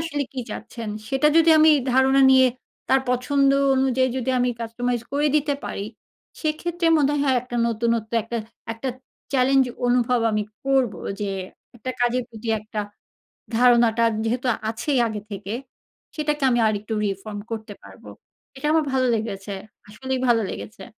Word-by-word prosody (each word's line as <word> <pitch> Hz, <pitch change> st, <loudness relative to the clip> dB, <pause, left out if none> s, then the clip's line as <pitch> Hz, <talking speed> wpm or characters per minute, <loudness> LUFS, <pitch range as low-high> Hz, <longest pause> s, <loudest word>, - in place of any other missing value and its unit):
আসলে 325 Hz, -3 st, -2 dB
কি 260 Hz, -, -4 dB
চাচ্ছেন? 225 Hz, +1 st, -7 dB, 0.2 s
সেটা 270 Hz, +3 st, +2 dB
যদি 330 Hz, 0 st, +6 dB
আমি 315 Hz, 0 st, +7 dB, 0.2 s
ধারণা 265 Hz, +1 st, +4 dB
নিয়ে 260 Hz, -1 st, +6 dB, 0.4 s
তার 265 Hz, 0 st, +4 dB
পছন্দ 275 Hz, +2 st, +2 dB, 0.2 s
অনুযায়ী 260 Hz, -1 st, +2 dB
যদি 260 Hz, +1 st, -1 dB
আমি 250 Hz, 0 st, +2 dB
কাস্টমাইজ 240 Hz, +1 st, -2 dB
করে 290 Hz, +1 st, +2 dB
দিতে 290 Hz, -1 st, +1 dB
পারি, 200 Hz, -, -4 dB, 0.5 s
সেক্ষেত্রে 335 Hz, +2 st, -1 dB
মনে 285 Hz, -1 st, +3 dB
হয়, 290 Hz, -, 0 dB
হয় 260 Hz, -2 st, +3 dB
একটা 245 Hz, -1 st, -6 dB
নতুনত্ব 230 Hz, -1 st, -1 dB
একটা, 235 Hz, +2 st, -5 dB, 0.4 s
একটা 230 Hz, +4 st, -5 dB, 0.4 s
চ্যালেঞ্জ 265 Hz, 0 st, +4 dB, 0.2 s
অনুভব 245 Hz, 0 st, +2 dB
আমি 215 Hz, 0 st, 0 dB, 0.2 s
করবো। 265 Hz, -7 st, +1 dB, 0.2 s
যে 200 Hz, -1 st, -1 dB, 0.5 s
একটা 255 Hz, +3 st, -5 dB
কাজের 245 Hz, +1 st, +2 dB
প্রতি 225 Hz, -1 st, -9 dB
একটা 215 Hz, 0 st, -5 dB, 0.8 s
ধারণাটা 235 Hz, -2 st, +4 dB, 0.2 s
যেহেতু 245 Hz, +3 st, -1 dB, 0.2 s
আছেই 260 Hz, +4 st, -1 dB
আগে 215 Hz, -1 st, -5 dB
থেকে, 200 Hz, +1 st, -6 dB, 0.6 s
সেটাকে 300 Hz, -1 st, -1 dB
আমি 240 Hz, -, +2 dB
আরেকটু 215 Hz, +1 st, -3 dB
reform 205 Hz, +1 st, -4 dB
করতে 220 Hz, -2 st, -5 dB
পারবো। -, -, -14 dB, 0.5 s
এটা 270 Hz, -, -4 dB
আমার 320 Hz, -1 st, +3 dB
ভালো 260 Hz, -1 st, +2 dB
লেগেছে। 205 Hz, -2 st, -4 dB, 0.4 s
আসলেই 260 Hz, +4 st, -4 dB
ভালো 230 Hz, -2 st, +4 dB
লেগেছে। 230 Hz, -, -8 dB
250 Hz, 150 wpm, -23 LUFS, 225-270 Hz, 0.8 s, আমি